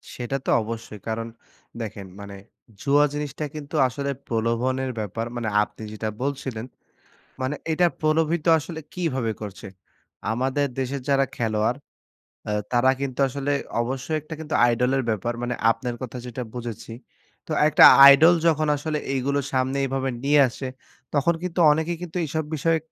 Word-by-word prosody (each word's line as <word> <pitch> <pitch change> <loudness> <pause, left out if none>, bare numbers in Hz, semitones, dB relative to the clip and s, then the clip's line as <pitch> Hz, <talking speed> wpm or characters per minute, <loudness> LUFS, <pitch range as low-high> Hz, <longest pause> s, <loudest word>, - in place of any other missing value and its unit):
সেটা 125 +2 -3
তো - - -2
অবশ্যই। 110 -1 -7
কারণ 115 0 -2 0.5
দেখেন 105 -3 -6
মানে 100 0 -8 0.5
জুয়া 145 +1 +4
জিনিসটা 150 0 -4
কিন্তু 150 +1 -7
আসলে 140 +3 -3 0.2
প্রলোভনের 120 +3 0
ব্যাপার। 110 +2 -3
মানে 120 -2 -3 0.2
আপনি 105 - -11
যেইটা 110 0 -3
বলছিলেন। 130 -5 -3 0.8
মানে 130 +3 -1 0.2
এইটা 175 +2 +3
প্রলোভিত 155 +1 +1
আসলে 160 +2 -7
কীভাবে 135 -10 -1
করছে? 100 -2 -7 0.6
আমাদের 130 +5 0
দেশের 135 +1 -2
যারা 135 0 +3
খেলোয়াড় 110 +2 0 0.7
অ্যা 105 - -1 0.2
তারা 125 +1 +4
কিন্তু 135 -1 -3
আসলে 140 +2 -2 0.3
অবশ্যই 135 +5 -3
একটা 155 +2 -8
কিন্তু 155 0 -5
আইডল 120 +1 +2
এর 135 - +1
ব্যাপার। 110 +2 -1
মানে 120 0 -2 0.2
আপনার 120 +2 -2
কথা 125 -1 -6
যেইটা 125 +1 -5
বুঝেছি। 120 -2 -6 0.5
তো - - -4 0.2
একটা 155 - +7 0.2
আইডল 155 +5 +8
যখন 155 -2 +3
আসলে 150 +1 -2 0.2
এইগুলো 140 +2 0
সামনে 130 +1 0
এইভাবে 135 0 -1
নিয়ে 145 +1 +5
আসে, 130 +2 -6 0.5
তখন 150 +4 +3
কিন্তু 180 -1 -2
অনেকেই 160 +3 -1
কিন্তু 175 0 -7
এসব 155 +2 -2
বিষয়ে 160 +2 +1
135 Hz, 150 wpm, -24 LUFS, 115-150 Hz, 0.8 s, আইডল